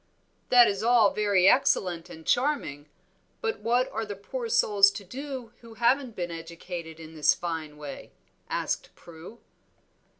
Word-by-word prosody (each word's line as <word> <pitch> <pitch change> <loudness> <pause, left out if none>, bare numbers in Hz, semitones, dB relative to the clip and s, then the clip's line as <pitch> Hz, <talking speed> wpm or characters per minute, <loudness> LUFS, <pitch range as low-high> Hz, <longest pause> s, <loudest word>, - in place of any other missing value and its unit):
"That 245 -1 +7
is 200 0 -1
all 230 -3 +4
very 200 -3 +3
excellent 180 -9 +2
and 160 -2 -12
charming, 245 - 0 0.5
but 450 -1 -2
what 240 +4 +1
are 225 - -3
the 205 -2 -6
poor 465 - -6
souls 205 - +5
to 200 - -8
do 255 +2 -7
who 230 -1 -13
haven't 240 +1 +1
been 175 -1 -4
educated 165 0 -8
in 160 0 -11
this 150 -2 +3
fine 160 -3 -5
way?" 145 -2 -9 0.4
asked - - -3
Prue. 170 +6 -13
200 Hz, 145 wpm, -27 LUFS, 165-240 Hz, 0.5 s, That